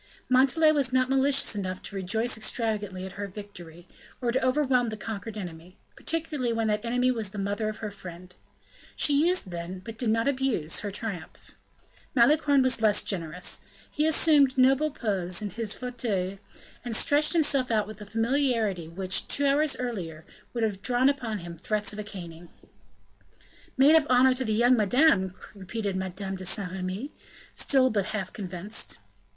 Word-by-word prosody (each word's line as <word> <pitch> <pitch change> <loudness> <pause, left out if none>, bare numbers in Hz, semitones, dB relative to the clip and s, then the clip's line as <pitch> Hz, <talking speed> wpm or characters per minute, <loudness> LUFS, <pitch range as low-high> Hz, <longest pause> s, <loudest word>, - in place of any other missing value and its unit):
Montalais 275 +5 +5
was 280 -4 +1
not 255 0 +2
malicious 270 0 +3
enough 185 -2 -3
to - - -7
rejoice 220 +6 0
extravagantly 215 -4 -2
at 190 - -7
her 205 +2 -5
victory, 180 -4 -11 0.3
or 240 -2 0
to 260 +2 0
overwhelm 255 -2 +2
the 215 - -6
conquered 220 0 -6
enemy, 175 -2 -8 0.2
particularly 305 -6 -2
when 225 -1 0
that 210 0 0
enemy 250 +2 +1
was 225 -5 -2
the 205 - -10
mother 205 +2 -1
of 215 - -6
her 210 - -4
friend; 180 -2 -11 0.6
she 295 +2 +3
used 355 - 0
then, 175 +2 -5
but 225 -1 -8
did 240 - 0
not 225 +3 +1
abuse 260 - 0
her 205 - -4
triumph. 195 -5 -6 0.6
Malicorne 285 +2 +4
was 255 -3 +2
less 210 -2 +3
generous; 180 -2 -3 0.3
he 305 +1 +1
assumed 295 -4 +4
noble 270 +4 +4
poses 190 -9 -2
in 210 -2 -4
his 220 +1 -3
fauteuil 215 -7 -3 0.4
and 240 -2 -3
stretched 300 +4 +3
himself 290 -6 +3
out 215 -2 +1
with 215 0 -10
a - - -7
familiarity 225 - 0
which, 185 +2 +1
two 285 - +3
hours 280 0 +2
earlier, 175 -11 -5 0.3
would 235 -2 -2
have 205 -3 -1
drawn 250 +4 +3
upon 245 -6 -2
him 170 -2 -8
threats 210 +5 -2
of 210 - -7
a - - -3
caning. 175 -4 -10 1.3
"Maid 275 +4 +6
of 315 -2 +5
honor 255 +1 +5
to 255 +1 -3
the 220 - -2
young 240 +3 +4
madame!" 210 - +3 0.2
repeated 200 0 -4
Madame 190 +1 -4
de 185 - -8
Saint 195 0 -2
Remy, 190 +9 -4 0.4
still 260 -2 +3
but 200 -3 0
half 210 -3 -4
convinced. 190 +1 -5
220 Hz, 170 wpm, -27 LUFS, 190-260 Hz, 1.3 s, Maid